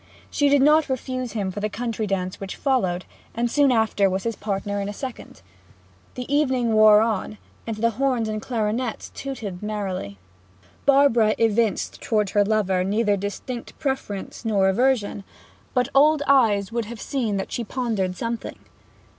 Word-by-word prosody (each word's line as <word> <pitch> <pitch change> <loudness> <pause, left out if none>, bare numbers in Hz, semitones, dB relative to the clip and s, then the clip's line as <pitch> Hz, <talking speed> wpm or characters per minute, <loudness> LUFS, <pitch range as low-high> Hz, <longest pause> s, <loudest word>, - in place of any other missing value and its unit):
She 290 -1 +2
did 280 -1 +4
not 300 +1 +4
refuse 255 -1 -3
him 200 -4 -2
for 205 - -5
the 210 +1 -1
country 225 -1 -3
dance 185 -2 -2
which 195 -1 -6
followed, 190 -10 0 0.3
and 235 +1 0
soon 285 -2 +4
after 220 -4 +2
was 190 +1 -2
his 230 -1 -2
partner 200 0 -3
in 200 - -3
a - - -5
second. 255 +3 -8 0.7
The 250 - -5
evening 255 -6 +1
wore 215 -1 +7
on, 215 -1 -1 0.3
and 225 -2 -3
the 230 +2 +2
horns 250 -1 0
and 215 0 -3
clarionets 225 0 -2
tootled 225 -10 -6
merrily. 195 - -4 0.7
Barbara 270 -6 +5
evinced 225 -2 0
towards 210 -3 0
her 205 - +4
lover 200 -3 +1
neither 205 +2 +1
distinct 205 +5 -6
preference 265 -9 -4
nor 200 -4 +2
aversion; 220 -2 +1 0.5
but 250 0 +2
old 295 +2 +5
eyes 225 -7 +3
would 235 -1 -2
have 230 +1 -8
seen 230 -7 -2
that 195 - -4
she 240 - -2
pondered 215 -6 -2
something. 230 0 -4
220 Hz, 160 wpm, -23 LUFS, 205-255 Hz, 0.7 s, wore